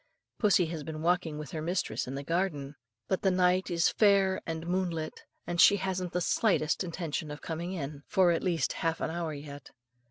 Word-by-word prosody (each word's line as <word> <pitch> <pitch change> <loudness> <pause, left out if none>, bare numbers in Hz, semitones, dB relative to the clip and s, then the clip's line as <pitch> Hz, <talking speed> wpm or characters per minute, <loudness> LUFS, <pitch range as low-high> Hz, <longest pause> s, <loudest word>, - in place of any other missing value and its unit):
Pussy 200 -5 +4
has 160 -1 -5
been 155 +1 -6
walking 175 -3 +1
with 150 -2 -7
her 155 - -4
mistress 155 - -2
in 130 - -4
the 140 - -4
garden; 150 -4 -1 0.3
but 190 - 0
the 195 - +3
night 185 0 +2
is 170 -1 +3
fair 195 -3 +3
and 165 0 -4
moonlit, 175 -3 -2 0.2
and 175 0 +1
she 200 - +8
hasn't 185 -2 -2
the 180 - -1
slightest 180 -4 +1
intention 165 -3 -4
of 150 0 -6
coming 170 +2 -4
in, 145 -4 -5
for 185 -2 +4
at 165 - 0
least 175 -3 0
half 165 -1 -1
an - - -2
hour 170 -1 -3
yet. 145 0 -9
170 Hz, 195 wpm, -30 LUFS, 155-185 Hz, 0.3 s, she